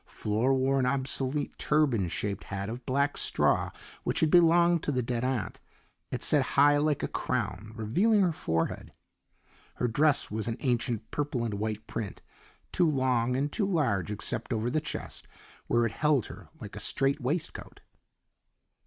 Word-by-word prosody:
Flora 110 +6 0
wore 135 +1 +2
an 125 - +1
obsolete 135 +1 -1
turban 140 -11 +2
shaped 100 +4 -3
hat 100 +1 -4
of 120 +2 -6
black 140 +2 +1
straw - - +2 0.3
which - - -1
had 160 -2 +3
belonged 170 0 +5
to - - -1
the 130 -2 0
dead 120 0 -2
aunt; 130 -1 -2 0.5
it - - -4
set - - +4 0.2
high 145 +1 +6
like 150 -1 +1
a - - +1
crown, 105 +1 -3
revealing 185 - +2
her 180 -3 +3
forehead. 80 - -2 0.8
Her 125 - 0
dress 140 +3 +2
was 110 +1 -2
an 115 0 -2
ancient 120 -4 -1
purple 140 -5 -2
and 115 -3 -2
white 110 +1 -3
print, 110 -4 -6 0.5
too 175 -3 +3
long 125 -3 +1
and 140 +3 -1
too 200 +2 0
large 130 - +1
except 105 +4 -2
over 115 +1 0
the 155 - +1
chest, 150 - -6 0.4
where 120 0 +2
it 115 - -1
held 145 -2 +2
her - - -11
like - - -9
a - - -6
straight 140 +2 0
waistcoat. 150 +7 -4
130 Hz, 165 wpm, -29 LUFS, 115-150 Hz, 0.8 s, high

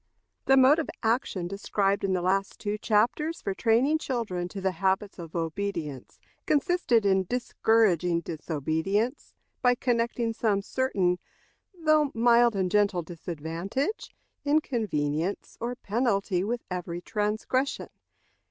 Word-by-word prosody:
The 270 - +5
mode 270 +4 +6
of 320 - -3
action 225 -6 0
described 195 +1 0
in 195 -1 +1
the 180 -1 0
last 195 +2 0
two 205 0 -2
chapters 245 +10 +1
for 195 - -3
training 240 +9 +2
children 215 - -2
to 190 +1 -2
habits 190 +3 -1
of 165 -1 -9
obedience 165 -5 -4 0.3
consisted 295 - +2
in 190 -1 +3
discouraging 205 -7 +2
disobedience 160 - -2 0.3
by 245 -1 +4
connecting 235 -1 0
some 210 -3 0
certain, 195 -9 0 0.6
though 310 -3 +3
mild 235 0 +4
and 185 -2 0
gentle 200 -4 +2
disadvantage, 175 - -4 0.3
inconvenience, 200 - -1
or 240 +1 -2
penalty, 200 -5 0
with 235 +4 -2
every 175 -1 -4
transgression. 215 +7 -1
205 Hz, 115 wpm, -27 LUFS, 180-240 Hz, 0.6 s, mode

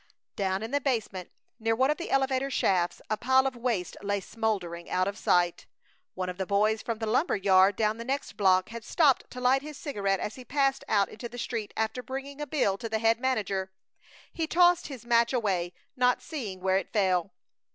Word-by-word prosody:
Down 190 0 -1
in 225 - -5
the 285 0 +1
basement, 220 -9 -2 0.3
near 225 0 +1
one 260 +4 +3
of 300 - -1
the 345 - -6
elevator 270 0 +1
shafts, 180 -9 0
a 215 - -1
pile 260 +3 +3
of 265 -1 -1
waste 235 -7 -2
lay 205 0 -1
smoldering, 190 -5 -3
out 185 +1 +1
of 200 - -3
sight. 175 -4 +1 0.5
One 185 0 -3
of 180 +1 -6
the 190 - -2
boys 215 +2 +2
from 230 -2 -3
the 225 - -3
lumber 245 +10 +1
yard 195 0 +4
down 215 0 0
the 230 - -6
next 270 0 -3
block 185 -2 +3
had 230 0 -7
stopped 275 +2 +2
to 250 - -8
light 255 +2 +3
his 300 0 -8
cigarette 200 - -1
as 210 - -3
he 255 - -9
passed 275 +1 0
out 200 -2 +2
into 235 +2 -8
the 245 - -10
street 230 -3 -4
after 220 +3 -1
bringing 275 +3 -6
a 295 - -3
bill 205 -9 0
to 230 - -5
the 220 - 0
head 225 +1 +2
manager. 200 -7 -1 0.6
He 325 -1 -2
tossed 350 +1 +4
his 260 -5 -9
match 235 +1 +3
away, 190 -8 0 0.2
not 250 0 +2
seeing 210 - -6
where 190 0 +2
it - - -9
fell. 190 -4 +1
225 Hz, 210 wpm, -28 LUFS, 195-260 Hz, 0.6 s, yard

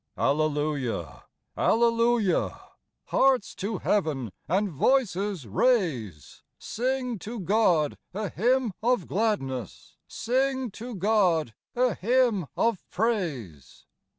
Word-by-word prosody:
Alleluia! 145 -3 -1 0.3
Alleluia! 230 -3 +2 0.5
Hearts 265 -5 +2
to 200 +1 -3
heaven, 150 - 0 0.2
and 195 +5 +1
voices, 200 - +1
raise; 120 - 0 0.2
Sing 250 -1 -2
to 225 +5 -6
God 180 -6 +2
a 205 +1 -3
hymn 245 0 +1
of 240 -5 +1
gladness, 130 - -2
Sing 260 0 -1
to 235 +3 -8
God 180 - +2 0.2
a 250 -2 +2
hymn 225 - +1
of 230 -5 +1
praise. 160 - -3
205 Hz, 95 wpm, -27 LUFS, 155-235 Hz, 0.5 s, Alleluia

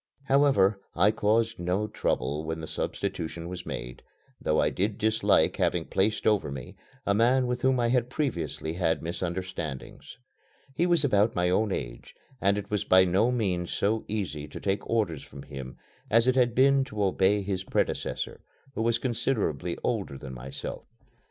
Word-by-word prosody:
However, 135 -9 +3
I 105 - +5
caused 115 +2 +1
no 90 +4 0
trouble 75 -7 -1
when 80 +1 -4
the 80 - -5
substitution 85 +1 -4
was 90 0 -7
made, 60 +2 -6 0.4
though 75 - +1
I - - +2
did 100 +2 -1
dislike 110 +1 +2
having 85 -2 +1
placed 105 +3 0
over 105 -8 +2
me 70 -3 -7 0.3
a 100 - +2
man 125 +5 +3
with 125 0 -2
whom 130 0 +3
I 120 -1 +2
had 125 -1 +1
previously 85 - -2
had 85 -2 0
misunderstandings. 85 - -5 0.6
He 175 +5 +1
was 170 -3 +4
about 105 -5 +3
my 90 0 +2
own 105 +2 +2
age - - -5 0.3
and 100 +1 +3
it 100 0 -6
was 105 -2 0
by 95 0 +6
no 95 +6 +3
means 95 -8 -1
so 110 +2 0
easy 90 -8 -3
to - - -8
take 100 0 -2
orders 100 -11 0
from 70 - -11
him 65 -3 -8 0.3
as 115 +2 +4
it 130 - +5
had 125 -2 +2
been 135 +1 +5
to 105 -6 -3
obey 100 +1 +2
his 95 -1 -2
predecessor, - - -2 0.3
who - - -3
was 115 0 +2
considerably 110 - -1
older 100 - -2
than 65 -1 -8
myself. 65 +2 -6
100 Hz, 170 wpm, -28 LUFS, 85-115 Hz, 0.6 s, by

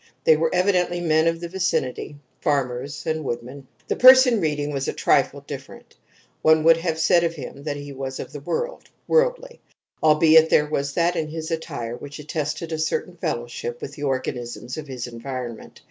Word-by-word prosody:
They 160 - +6
were 160 +1 +1
evidently 180 -1 +1
men 160 -1 +2
of 165 0 0
the 170 - -4
vicinity 170 -6 -2 0.3
farmers 140 -1 -2
and 160 -1 -1
woodmen. 130 +2 -6 0.2
The - - 0
person 255 -3 +7
reading 150 -2 -1
was 135 -1 -2
a - - -1
trifle - - +2
different; - - -10 0.5
one 160 0 +4
would 165 0 +6
have 165 -1 -2
said 165 +2 +4
of 165 0 -1
him 140 -1 -8
that 145 -2 -2
he 145 0 -8
was 135 0 -5
of - - -7
the 145 - -6
world, 485 - -4 0.2
worldly, - - +1 0.4
albeit 160 +1 +6
there 150 - +4
was 140 -2 -2
that 175 +2 +1
in 160 -2 -1
his 160 +1 -6
attire 145 -8 -4
which 145 +3 -9
attested 155 +2 -4
a 160 - -2
certain 160 +3 -2
fellowship 120 -7 -4
with 140 - -7
the 145 - -11
organisms 125 -3 -3
of 155 -1 -7
his 130 -3 -5
environment. 120 -1 -7
155 Hz, 180 wpm, -23 LUFS, 135-165 Hz, 0.5 s, person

